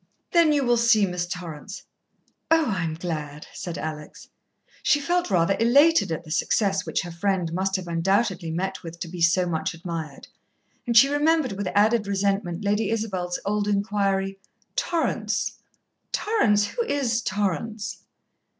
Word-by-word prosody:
"Then 335 -3 +5
you 290 -2 +2
will 240 -1 +3
see 230 -3 +4
Miss 180 -1 -3
Torrance." 180 +1 -7 0.7
"Oh, 325 -1 +4
I'm 165 -5 -2
glad," 150 -3 -5
said 175 -3 -6
Alex. 150 -1 -7 0.5
She 290 - +3
felt 350 +2 0
rather 185 0 +2
elated 280 - +5
at 160 +1 -3
the 155 - -11
success 195 +3 +1
which - - -1
her 175 - -7
friend 175 -1 -1
must 190 +2 0
have 185 -2 -3
undoubtedly 180 +1 0
met 190 +4 -3
with, 170 0 -9
to - - -3
be 175 +1 -7
so 180 +2 +4
much 165 -2 -2
admired, 165 -4 -6 0.6
and 235 -1 +3
she 270 - +9
remembered 295 0 +2
with 195 0 -4
added 210 +1 +3
resentment 195 -2 -1
Lady 210 +1 +1
Isabel's 190 -6 -2
old 205 0 0
inquiry: 200 -1 0 0.4
"Torrance 335 -2 -1 0.5
Torrance 210 - +2
who 470 - -2
is 250 - 0
Torrance?" 205 +2 -2
195 Hz, 150 wpm, -25 LUFS, 175-230 Hz, 0.7 s, she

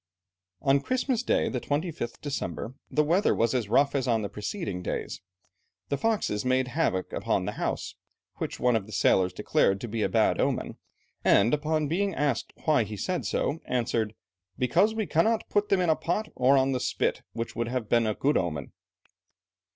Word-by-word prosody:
On 135 +1 +4
Christmas 255 - 0
Day, 250 - +1
the 125 - -2
25th 145 -5 -3
December, 135 -4 -4 0.2
the 150 - +2
weather 175 +7 +2
was 115 +1 +1
as 120 -6 -1
rough 140 +5 +3
as 135 -2 0
on 115 -3 +2
the 100 - -3
preceding 105 - -4
days. - - -4 0.7
The 140 - 0
foxes 215 - 0
made 130 0 +1
havoc 120 - -1
upon - - 0
the - - -2
house, - - -3 0.4
which - - -4
one 125 -1 +3
of 105 -3 -1
the 110 - -10
sailors 95 -2 +3
declared 95 0 +1
to 120 - -4
be 110 0 -3
a - - +1
bad - - +2
omen, - - -1 0.5
and 105 +4 +4
upon 155 0 +1
being 190 +4 0
asked 145 -5 -1
why 150 -6 +4
he 105 0 -7
said 170 - -2
so, 155 - -1
answered, 115 -3 -1 0.4
"Because 180 - +2
we 220 -1 -1
cannot 200 +8 +1
put 205 0 +1
them 195 - +3
in 175 -3 +3
a - - +3
pot, 210 +8 -2
or 130 +2 +4
on 135 0 +3
the 130 - 0
spit, 125 - -1
which 115 0 -4
would 115 +1 -1
have 125 -2 -2
been 115 0 +3
a 105 - 0
good 145 +2 +2
omen." 75 -6 -3
130 Hz, 190 wpm, -27 LUFS, 115-165 Hz, 0.7 s, On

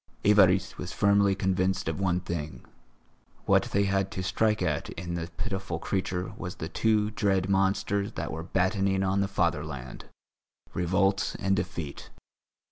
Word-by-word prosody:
Évariste 95 -2 +4
was 90 - -5
firmly 100 -1 +3
convinced 95 -1 0
of 80 +3 -2
one 90 -2 +1
thing, 85 -3 -5 0.8
what - - +4
they 100 - +1
had 95 -1 +1
to 95 - -4
strike 105 +4 +1
at - - -1
in 85 +1 -5
the 85 0 -3
pitiful 95 -6 -3
creature 90 +1 -2
was 90 -2 -5
the 80 - -5
two 105 +4 +1
dread 95 -4 +1
monsters 95 +1 +1
that - - -4
were 80 - -4
battening 95 +2 +1
on 95 +1 +1
the 100 - +1
fatherland, 75 -8 -2 0.7
revolt 95 +3 +1
and 95 0 +2
defeat. 85 -5 -4
95 Hz, 145 wpm, -28 LUFS, 85-100 Hz, 0.8 s, Évariste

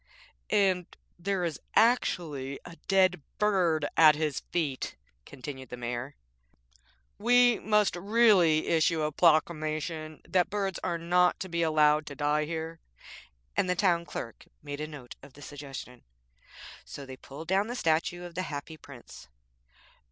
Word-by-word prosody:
'And 190 -3 +2 0.3
there 190 +1 -1
is 165 -3 -3 0.2
actually 155 - +1
a 175 - -10
dead 185 -3 +3 0.2
bird 180 -7 +2
at 155 -2 +7
his 150 -3 -1
feet,' 150 -7 -2 0.3
continued 130 -1 -8
the 125 - -7
Mayor. 120 +3 -5 1.0
'We 245 +1 +4
must 210 -2 +2
really 190 -5 +4
issue 160 -1 +2
a 150 - 0
proclamation 155 -1 +1
that 180 0 +2
birds 195 -3 -2
are 175 -2 -1
not 180 +2 +2
to 190 - -4
be 170 0 -1
allowed 155 -1 +3
to 145 - -7
die 150 +2 +1
here.' 160 +1 -5 0.8
And 185 - +1
the 180 - +2
Town 175 -3 +2
Clerk 115 -8 -7 0.2
made 145 0 -6
a 155 - -3
note 145 -5 -10
of 140 -1 -15
the 145 - -15
suggestion. 135 -4 -9 0.8
So 140 - -9
they 130 -1 -9
pulled 145 +5 -11
down 195 +3 +2
the 240 - -4
statue 170 -2 0
of 175 -1 -9
the 180 - -2
Happy 150 +2 -6
Prince. 125 - -13
160 Hz, 145 wpm, -29 LUFS, 145-180 Hz, 1.0 s, at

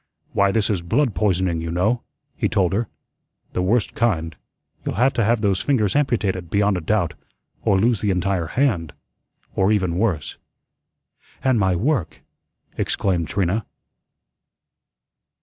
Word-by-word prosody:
"Why, 100 0 +3
this 110 0 +1
is 95 -4 -1
blood 120 +8 +1
poisoning, 90 -2 +1
you 85 - -4
know," 100 +8 +1 0.3
he - - 0
told 95 -1 +1
her; 110 +3 0 0.7
"the - - 0
worst 105 +4 +1
kind. 85 -9 0 0.5
You'll - - -3
have 125 +6 +3
to 115 - +1
have 115 +1 +2
those 100 -3 +1
fingers 110 -9 +1
amputated, 105 - 0
beyond 100 +2 +2
a 90 - -2
doubt, 80 - 0 0.5
or 95 - +3
lose 115 +2 +2
the 105 - 0
entire 95 -2 0
hand 95 - 0 0.6
or 95 +2 +3
even 95 -4 +1
worse." 95 -9 -1 1.0
"And 130 -4 +3
my 95 -2 +2
work!" 105 - -1 0.6
exclaimed 90 -5 0
Trina. 100 +5 0
100 Hz, 140 wpm, -22 LUFS, 90-115 Hz, 1.0 s, Why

